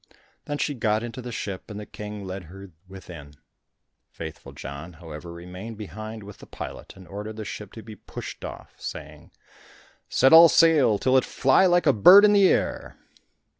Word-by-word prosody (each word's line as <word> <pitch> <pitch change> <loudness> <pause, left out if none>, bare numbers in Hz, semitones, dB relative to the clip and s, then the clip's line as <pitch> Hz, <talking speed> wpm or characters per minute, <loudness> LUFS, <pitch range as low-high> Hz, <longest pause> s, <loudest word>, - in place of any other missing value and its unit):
Then 145 - -3
she 145 - -1
got 110 -3 0
into 120 +2 -7
the 125 0 -7
ship, 100 -3 -6
and 105 -1 -7
the 105 - -8
King 105 -1 -8
led 95 -1 -7
her 95 +3 -12 0.2
within. 85 -6 -12 0.7
Faithful 80 -2 -9
John, 70 +5 -9
however, 80 0 -10
remained 90 +6 -9
behind 110 +1 -8
with 100 0 -12
the - - -14
pilot, - - -9
and 95 -2 -14
ordered 105 +4 -7
the 110 -1 -7
ship 105 -1 -8
to 110 - -10
be 110 -1 -11
pushed - - -9
off, - - -9
saying, - - -9 0.8
"Set 135 - +4
all 165 +1 +10
sail, 150 -11 +4
till 130 +5 +2
it 130 - +3
fly 135 +8 +3
like 175 -1 +2
a 140 - +5
bird 185 - +8
in 205 0 +4
air." 195 -2 +1
105 Hz, 175 wpm, -24 LUFS, 95-130 Hz, 0.8 s, all